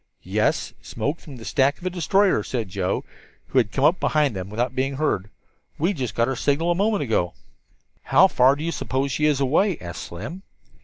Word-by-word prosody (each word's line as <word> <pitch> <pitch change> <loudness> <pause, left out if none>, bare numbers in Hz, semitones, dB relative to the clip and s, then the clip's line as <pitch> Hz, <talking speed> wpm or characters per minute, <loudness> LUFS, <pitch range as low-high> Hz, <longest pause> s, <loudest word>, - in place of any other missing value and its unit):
"Yes, - - 0
smoke 150 +4 -3
from 145 - -11
the 115 -3 -10
stack 140 0 +2
of - - -17
the 185 - -1
destroyer," 185 - +2
said 110 -1 -3
Joe, 95 -1 -1 0.5
who 130 - +3
had 105 -5 0
come 135 - -1
up 170 +4 +4
behind 150 -7 +1
them 95 0 -5
without 120 +4 -1
being 135 +1 -1
heard. 130 -9 -1 0.5
"We 175 +7 +1
just 130 - -4
got 115 0 +2
her 135 - -1
signal 145 +7 +1
a - - +4
moment 205 -1 +1
ago." 110 -8 0 0.7
"How 190 - +6
far 135 -5 +4
do 145 - -6
you 170 - -1
suppose 135 -3 -2
she 150 +3 +1
is 145 -3 +2
away?" 160 +8 +2
asked 85 -1 -7
Slim. 120 - -7
140 Hz, 205 wpm, -23 LUFS, 115-165 Hz, 0.7 s, How